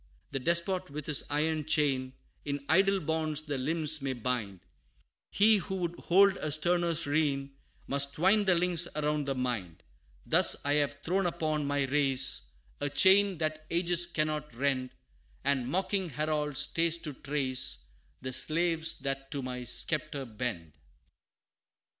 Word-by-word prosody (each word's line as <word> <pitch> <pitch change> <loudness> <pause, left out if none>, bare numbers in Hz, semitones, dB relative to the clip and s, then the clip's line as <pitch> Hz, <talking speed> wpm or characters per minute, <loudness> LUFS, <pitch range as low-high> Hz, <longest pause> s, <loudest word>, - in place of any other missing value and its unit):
The 135 - -2
despot 170 +5 0
with 145 0 -6
his 150 -4 +2
iron 155 +1 0
chain, 140 -4 +1 0.3
In 140 -1 -4
idle 195 +3 +3
bonds 155 -2 -1
the 145 -3 -3
limbs 155 +2 +1
may 135 -1 -2
bind 115 -6 -3 0.7
He 215 +1 +5
who 190 0 -4
would 175 -2 -2
hold 195 +2 +4
a 155 - -2
sterner 170 +2 +2
reign, 145 -2 0 0.3
Must 140 0 0
twine 200 +6 +3
the 185 -2 +4
links 175 0 0
around 150 -1 -1
the 135 - -1
mind. 120 -10 -3 0.4
Thus - - +4
I 145 - +2
have 145 -1 +1
thrown 185 +2 +1
upon 155 -3 -1
my 145 -1 +1
race, 135 - +1 0.3
A 145 - -1
chain 190 +5 +5
that 155 0 -3
ages 175 0 +2
cannot 155 -4 -2
rend 130 0 0 0.5
And 135 -3 +1
mocking 190 +2 -1
Harold 150 0 -2
stays 165 +3 +2
to 150 - -4
trace, 130 - -2 0.4
The 130 0 -4
slaves 160 +3 +1
that 135 0 -3
to 140 -1 -4
my 125 -1 -5
sceptre 150 +2 -1
bend." 105 - -4
150 Hz, 145 wpm, -30 LUFS, 135-170 Hz, 0.7 s, He